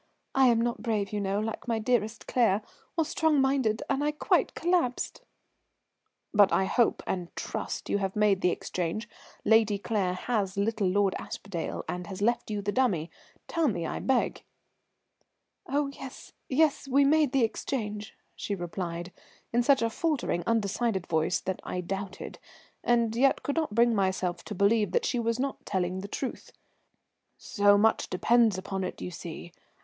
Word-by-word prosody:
I 265 Hz, -1 st, +5 dB
am 235 Hz, -2 st, +4 dB
not 235 Hz, 0 st, -1 dB
brave, 215 Hz, -4 st, -1 dB
you 205 Hz, -, -1 dB
know, 200 Hz, +1 st, 0 dB
like 220 Hz, +3 st, -4 dB
my 230 Hz, -1 st, +1 dB
dearest 220 Hz, -2 st, 0 dB
Claire, 220 Hz, -4 st, +2 dB, 0.3 s
or 325 Hz, -, +3 dB
strong 315 Hz, -1 st, +2 dB
minded, 265 Hz, -5 st, +2 dB
and 275 Hz, +1 st, 0 dB
I 295 Hz, -, +2 dB
quite 300 Hz, -, +1 dB
collapsed." 340 Hz, -8 st, 0 dB, 1.1 s
"But 205 Hz, -3 st, +6 dB
I 190 Hz, -, +3 dB
hope 235 Hz, +4 st, +2 dB
and 180 Hz, -2 st, -2 dB
trust -, -, -4 dB
you 205 Hz, -, +1 dB
have 195 Hz, -1 st, -2 dB
made 210 Hz, -2 st, +3 dB
the 180 Hz, -, +3 dB
exchange. 180 Hz, +5 st, -3 dB, 0.4 s
Lady 220 Hz, -2 st, +4 dB
Claire 195 Hz, -3 st, -1 dB
has 195 Hz, -2 st, -1 dB
little 210 Hz, 0 st, +1 dB
Lord 195 Hz, +1 st, +2 dB
Aspdale 185 Hz, -5 st, -5 dB
and 180 Hz, 0 st, -4 dB
has 195 Hz, -1 st, -6 dB
left 235 Hz, +3 st, +1 dB
you 205 Hz, -1 st, -3 dB
the 205 Hz, -, 0 dB
dummy? 200 Hz, -11 st, +1 dB, 0.4 s
Tell 330 Hz, -2 st, +1 dB
me, 175 Hz, -9 st, -1 dB
I -, -, -3 dB
beg." 265 Hz, -2 st, 0 dB, 1.3 s
"Oh, 290 Hz, +1 st, +1 dB
yes, 265 Hz, -2 st, -10 dB, 0.2 s
yes, 290 Hz, 0 st, +2 dB
we 275 Hz, +1 st, +4 dB
made 300 Hz, -1 st, +4 dB
the 270 Hz, -3 st, +3 dB
exchange," 215 Hz, -3 st, -3 dB, 0.2 s
she 205 Hz, -, -3 dB
replied, 175 Hz, -1 st, -5 dB, 0.4 s
in 240 Hz, -, +4 dB
such 265 Hz, 0 st, +4 dB
a 230 Hz, -, +2 dB
faltering, 280 Hz, -, -1 dB
undecided 220 Hz, -3 st, 0 dB
voice 160 Hz, +1 st, +1 dB
that 190 Hz, -1 st, -3 dB
I 180 Hz, -, -4 dB
doubted, 195 Hz, +2 st, -5 dB, 0.4 s
and 235 Hz, -2 st, +2 dB
yet 265 Hz, +3 st, +3 dB
could 285 Hz, -, -2 dB
not 310 Hz, -10 st, -1 dB
bring 235 Hz, +1 st, +5 dB
myself 185 Hz, -3 st, 0 dB
to 210 Hz, -, -6 dB
believe 205 Hz, 0 st, +2 dB
that -, -, +2 dB
she 245 Hz, -, 0 dB
was 230 Hz, 0 st, 0 dB
not 275 Hz, +1 st, -3 dB
telling 185 Hz, -1 st, -1 dB
the 200 Hz, -, -6 dB
truth. 260 Hz, +5 st, -5 dB, 0.9 s
"So 205 Hz, -1 st, +3 dB
much 220 Hz, +2 st, +2 dB
depends 225 Hz, +2 st, +3 dB
upon 190 Hz, 0 st, -3 dB
it, 185 Hz, -, -5 dB
you 180 Hz, -, -5 dB
see. 170 Hz, 0 st, -8 dB
215 Hz, 165 wpm, -28 LUFS, 190-245 Hz, 1.3 s, But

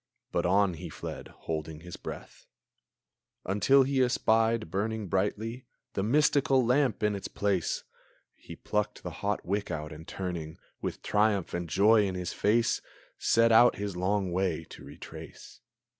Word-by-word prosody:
But -, -, +1 dB
on 100 Hz, 0 st, +3 dB
he 80 Hz, -, -7 dB
fled, -, -, -7 dB
holding 80 Hz, -1 st, -6 dB
his 90 Hz, 0 st, -8 dB
breath, -, -, -9 dB, 1.0 s
Until 105 Hz, +8 st, +4 dB
he 135 Hz, 0 st, +1 dB
espied, 115 Hz, -5 st, +2 dB
brightly 110 Hz, +1 st, -2 dB
burning, 110 Hz, +6 st, -1 dB, 0.3 s
The -, -, -1 dB
mystical 135 Hz, +2 st, +3 dB
lamp 125 Hz, -3 st, +2 dB
in 105 Hz, 0 st, +2 dB
its 100 Hz, -, -5 dB
place! 100 Hz, -5 st, -1 dB, 0.5 s
He -, -, -11 dB
plucked 105 Hz, 0 st, -2 dB
the -, -, -5 dB
hot 105 Hz, 0 st, -1 dB
wick 100 Hz, +3 st, -1 dB
out, 75 Hz, -3 st, -4 dB
and, 80 Hz, +2 st, -10 dB
turning, 85 Hz, -4 st, -5 dB, 0.2 s
With -, -, -4 dB
triumph 105 Hz, -3 st, +1 dB
and 85 Hz, -1 st, -3 dB
joy 105 Hz, +3 st, +5 dB
in 95 Hz, -, -3 dB
his 90 Hz, -1 st, -3 dB
face, 115 Hz, +3 st, +2 dB, 0.4 s
Set 115 Hz, 0 st, +4 dB
out 120 Hz, +2 st, +7 dB
his 100 Hz, -2 st, -4 dB
long 95 Hz, +1 st, 0 dB
way 90 Hz, -3 st, 0 dB
to -, -, -11 dB
retrace. -, -, -11 dB
100 Hz, 150 wpm, -29 LUFS, 90-115 Hz, 1.0 s, out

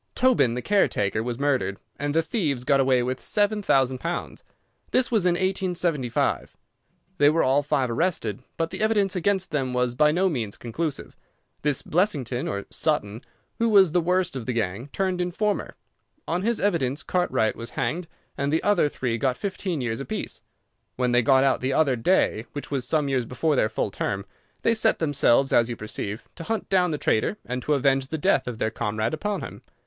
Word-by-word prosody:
Tobin, 245 Hz, -, +3 dB
the 125 Hz, -, -4 dB
caretaker, 110 Hz, -, +1 dB
was 120 Hz, 0 st, -3 dB
murdered, 130 Hz, -9 st, 0 dB, 0.2 s
and 145 Hz, +1 st, -2 dB
the 165 Hz, -, +3 dB
thieves 155 Hz, -, -1 dB
got 135 Hz, +2 st, +3 dB
away 130 Hz, -2 st, +3 dB
with 130 Hz, +1 st, -3 dB
seven 210 Hz, 0 st, +1 dB
thousand 130 Hz, -8 st, +2 dB
pounds. 170 Hz, +4 st, -4 dB, 0.5 s
This 255 Hz, -1 st, +1 dB
was 210 Hz, -6 st, +2 dB
in 175 Hz, -, +4 dB
1875. 175 Hz, -8 st, -1 dB, 0.6 s
They 145 Hz, -, +6 dB
were 165 Hz, +2 st, +2 dB
all 135 Hz, +2 st, +3 dB
five 145 Hz, -2 st, 0 dB
arrested, 115 Hz, -, -1 dB, 0.2 s
but 165 Hz, 0 st, -1 dB
the -, -, -4 dB
evidence 205 Hz, -3 st, +2 dB
against 190 Hz, 0 st, 0 dB
them 135 Hz, -4 st, -1 dB
was 125 Hz, -1 st, +1 dB
by 150 Hz, +4 st, +4 dB
no 185 Hz, +4 st, +2 dB
means 120 Hz, -, -3 dB
conclusive. 145 Hz, +5 st, -4 dB, 0.5 s
This 145 Hz, -2 st, 0 dB
Blessington 145 Hz, -, 0 dB
or 100 Hz, 0 st, -3 dB
Sutton, 115 Hz, -9 st, -1 dB, 0.4 s
who 230 Hz, 0 st, +2 dB
was 195 Hz, -6 st, +6 dB
the 175 Hz, +1 st, +2 dB
worst 180 Hz, -1 st, 0 dB
of 130 Hz, -3 st, -5 dB
the 125 Hz, -, 0 dB
gang, 110 Hz, +2 st, -2 dB
turned 185 Hz, -2 st, -1 dB
informer. 200 Hz, +4 st, -1 dB, 0.5 s
On 175 Hz, +2 st, -1 dB
his 230 Hz, +3 st, 0 dB
evidence 155 Hz, -8 st, 0 dB
Cartwright 175 Hz, -11 st, 0 dB
was 115 Hz, +1 st, -6 dB
hanged 175 Hz, +1 st, -1 dB, 0.3 s
and 140 Hz, +1 st, -1 dB
the 160 Hz, -, +1 dB
other 190 Hz, -8 st, +3 dB
three 120 Hz, -5 st, -2 dB
got 130 Hz, 0 st, 0 dB
fifteen 185 Hz, -5 st, -3 dB
years 115 Hz, -1 st, -2 dB
apiece. 210 Hz, +10 st, -5 dB, 0.5 s
When 125 Hz, -1 st, 0 dB
they 120 Hz, 0 st, +4 dB
got 130 Hz, +3 st, +4 dB
out 135 Hz, -1 st, +2 dB
the 130 Hz, +1 st, 0 dB
other 140 Hz, -4 st, +3 dB
day, 120 Hz, -4 st, +1 dB
which 145 Hz, -, -7 dB
was 130 Hz, -3 st, -1 dB
some 150 Hz, -1 st, +1 dB
years 130 Hz, -4 st, 0 dB
before 150 Hz, +4 st, 0 dB
their 110 Hz, -, +2 dB
full 110 Hz, -1 st, -2 dB
term, 100 Hz, 0 st, -3 dB, 0.4 s
they 230 Hz, -, +4 dB
set 220 Hz, 0 st, +2 dB
themselves, 140 Hz, -4 st, +2 dB
as 115 Hz, 0 st, +4 dB
you 120 Hz, -, -3 dB
perceive, 105 Hz, 0 st, -5 dB
to 165 Hz, -, -7 dB
hunt 225 Hz, +3 st, -3 dB
down 180 Hz, -2 st, +3 dB
the 155 Hz, -, -2 dB
traitor 145 Hz, -, 0 dB
and 125 Hz, +1 st, -3 dB
to 150 Hz, +4 st, +1 dB
avenge 135 Hz, -1 st, +2 dB
the 160 Hz, -, -3 dB
death 145 Hz, -, +2 dB
of 120 Hz, -3 st, -4 dB
their 110 Hz, 0 st, -1 dB
comrade 110 Hz, +1 st, -2 dB
upon 200 Hz, +6 st, -2 dB
him. -, -, -8 dB
145 Hz, 195 wpm, -25 LUFS, 125-180 Hz, 0.6 s, They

